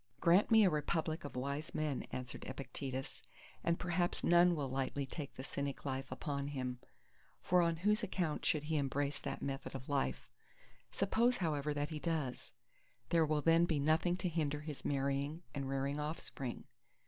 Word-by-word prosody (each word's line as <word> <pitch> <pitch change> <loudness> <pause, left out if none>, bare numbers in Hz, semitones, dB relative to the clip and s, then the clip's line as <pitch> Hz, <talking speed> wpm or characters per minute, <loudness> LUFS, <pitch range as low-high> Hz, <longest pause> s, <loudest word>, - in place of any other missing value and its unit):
Grant 175 +4 +5
me 225 -1 +7
a 190 - +6
republic 155 +1 0
of 145 - -7
wise 140 +5 -3
men, 155 -3 -1
answered 125 -1 -5
Epictetus, 130 0 -5 0.4
and 170 0 +2
perhaps 175 0 0
none 175 0 +6
will 145 -3 -1
lightly 135 +1 -1
take 140 +1 -6
the 130 - -6
Cynic 140 0 -4
life 135 -1 -3
upon 140 -3 -2
him. 130 -3 -3 0.6
For 180 0 +4
on 170 -1 +2
whose 210 +2 +4
account 180 -7 -1
should 155 -4 +2
he 155 +1 0
embrace 140 0 0
that - - -4
method 135 0 -4
of 130 +1 -7
life? 65 - 0 0.6
Suppose 235 +5 +2
however 150 -4 0
that 145 0 -1
he 155 - -4
does, 155 -6 -2 0.6
there 165 -2 +4
will 150 -1 +2
then 165 +2 +5
be 165 -3 +1
nothing 160 +4 +3
to 185 - -1
hinder 150 -3 0
his 150 -2 -6
marrying 140 +3 -1
and 140 -2 -3
rearing 135 +2 -1
offspring. 150 -4 -4
150 Hz, 170 wpm, -36 LUFS, 135-170 Hz, 0.6 s, me